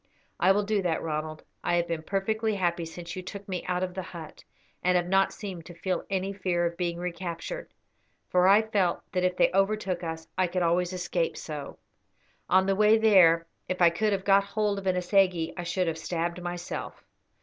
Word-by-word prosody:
"I 185 - +5
will 205 +2 +2
do 205 0 0
that, 175 -3 -1
Ronald; 155 0 -4 0.2
I 175 - +1
have 170 0 +1
been 165 -2 -2
perfectly 215 +5 -1
happy 175 -3 0
since 170 +1 -8
you 185 - -4
took 200 +2 -8
me 185 -3 -3
out 180 0 0
of 185 -1 -3
the 190 - -4
hut, 170 -3 -10 0.4
and 180 0 +2
have 175 -1 +2
not 195 +1 +3
seemed 185 -6 -7
to 175 - -11
feel 180 +1 -3
any 195 0 -1
fear 185 -3 0
of 170 0 -2
being 170 -1 -2
recaptured, 180 - -5 0.6
for 180 0 +3
I 205 +3 +6
felt 200 -5 0
that 180 - 0
if 180 0 +1
they - - +4
overtook 195 -2 +1
us 160 -1 -5
I 185 - +3
could 180 +1 -1
always 175 +1 +1
escape 175 -2 -2
so. 150 -3 -7 0.7
On 190 +1 +5
the 195 0 +2
way 215 +2 +5
there, 180 -7 +5 0.2
if 185 - -2
I 170 -2 +6
could 210 +5 0
have 195 -1 -1
got 200 0 +5
hold 205 0 -1
of 195 - -6
an 185 -1 +2
assegai 180 -2 +2
I - - -4
should 175 +2 -1
have 165 -1 -2
stabbed 170 +1 -3
myself." 175 0 -5
180 Hz, 205 wpm, -28 LUFS, 170-195 Hz, 0.7 s, I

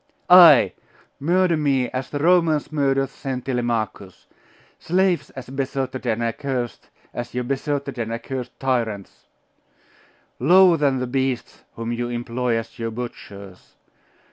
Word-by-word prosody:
'Ay! 170 -7 +8 0.5
murder 175 +3 +2
me 140 -5 +1
as 130 +1 -4
the 145 - -4
Romans 165 -1 +2
murdered 135 -2 +1
Saint 130 -2 -6
Telemachus! 115 -6 -3 0.5
Slaves 185 0 +1
as 130 -1 -9
besotted 130 -1 -3
and 115 0 0
accursed 120 +1 -4 0.2
as 120 0 -6
your 125 - -1
besotted 140 0 -3
and 115 -1 -3
accursed 125 +2 -6
tyrants! 115 -7 -3 1.1
Lower 180 +5 +6
than 140 -3 +1
the 125 - -2
beasts 130 -1 -3
whom 115 0 -4
you 120 0 -3
employ 120 0 -2
as 115 0 -7
your 115 0 -2
butchers! 100 -5 -9
130 Hz, 125 wpm, -22 LUFS, 120-145 Hz, 1.1 s, Ay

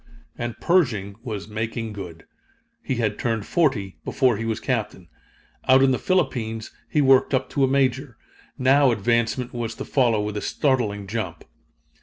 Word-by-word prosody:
And 120 -1 -5
Pershing 115 - +1
was 105 -6 -5
"making 110 +1 -4
good." 85 -5 -9 0.6
He 130 - -2
had 110 -3 -1
turned 115 -3 -1
forty, 130 - 0
before 130 -4 +2
he 115 - -4
was 110 -1 -1
Captain. 110 - -3 0.6
Out 130 +1 +6
in 135 - +4
the 130 - 0
Philippines 115 -12 -1 0.2
he 150 - +2
worked 135 0 +4
up 130 - -2
to 140 - +1
a - - +5
Major. 130 -1 0 0.4
Now 135 +2 +4
advancement 120 +2 0
was 115 -1 -4
to - - -6
follow 120 -6 +2
with 105 0 -3
a 105 - -2
startling 115 -8 0
jump. 95 -5 -4
115 Hz, 160 wpm, -23 LUFS, 105-130 Hz, 0.6 s, Out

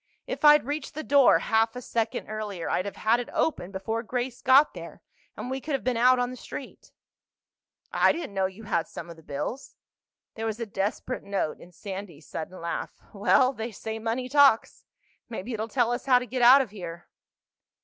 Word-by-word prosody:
If - - -5
I'd 295 -2 +7
reached 290 +1 -4
the 310 - -4
door 280 -4 +6
half 225 +1 +1
a - - -4
second 225 -1 -2
earlier 210 -5 -5
I'd 185 - 0
have 200 - -5
had 230 +2 +2
it 245 - -5
open 185 - -1
before 210 +4 -3
Grace 245 +1 -4
got 265 +3 +5
there - - -10 0.3
and - - -5
we 265 +1 -3
could 300 - -4
have 270 - -4
been 255 -1 0
out 250 +2 +5
on 245 0 0
the - - -7
street." - - -9 1.0
"I - - +5
didn't 335 -11 -5
know 190 -1 +1
you 190 +4 -12
had 170 -6 -1
some 170 0 -8
of - - -10
the 160 - -16
bills." 160 - -5 0.6
There 225 0 -4
was 220 +1 -3
a 230 - -2
desperate 205 +5 -3
note 200 -6 -2
in 175 - -14
Sandy's 190 -4 -8
sudden 180 +4 -6
laugh. 170 0 -4 0.2
"Well, 255 +6 +3
they 230 -1 -5
say 220 +2 -6
money 230 +3 -2
talks. 275 -4 +4 0.4
Maybe 230 +1 -5
it'll 220 0 -3
tell 240 0 +1
us 245 +3 -3
how 255 -2 +6
to 250 - -2
get 255 0 -3
out 255 +3 +8
of 245 -7 -5
here." 175 -4 -8
225 Hz, 200 wpm, -27 LUFS, 200-255 Hz, 1.0 s, out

